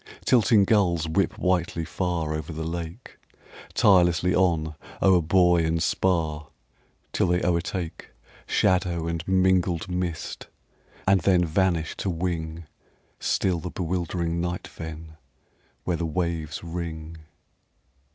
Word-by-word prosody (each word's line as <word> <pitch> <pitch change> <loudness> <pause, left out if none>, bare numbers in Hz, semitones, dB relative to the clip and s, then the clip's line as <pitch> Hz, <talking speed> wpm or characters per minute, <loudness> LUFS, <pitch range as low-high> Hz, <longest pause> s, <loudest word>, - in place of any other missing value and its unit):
Tilting 110 -4 +5
gulls 90 -7 +2
whip 90 +5 0
whitely 90 -2 0
far 85 -2 -2
Over 80 +1 -4
the 80 0 -4
lake, 85 +6 -6 0.6
Tirelessly 90 -2 +4
on 85 -4 +2 0.3
o'er 95 -2 +5
buoy 90 +1 +4
and 80 0 0
spar 80 -5 0 0.7
Till - - +2
they 90 +1 +1
o'ertake 85 0 -2 0.4
Shadow 90 -3 +1
and 85 -1 -2
mingled 95 -2 +2
mist 90 -2 -4 0.6
and 95 -1 +4
then 90 0 +3
Vanish 85 -1 0
to 95 - -2
wing 85 -2 -3 0.5
Still 90 -3 0
the 90 - -5
bewildering 85 -1 -2
night 90 0 -3
fen, 80 -1 -9 0.7
Where 90 -2 -1
the 85 - -2
waves 80 -3 -2
ring. 85 -1 -6
85 Hz, 115 wpm, -25 LUFS, 80-90 Hz, 0.7 s, Tilting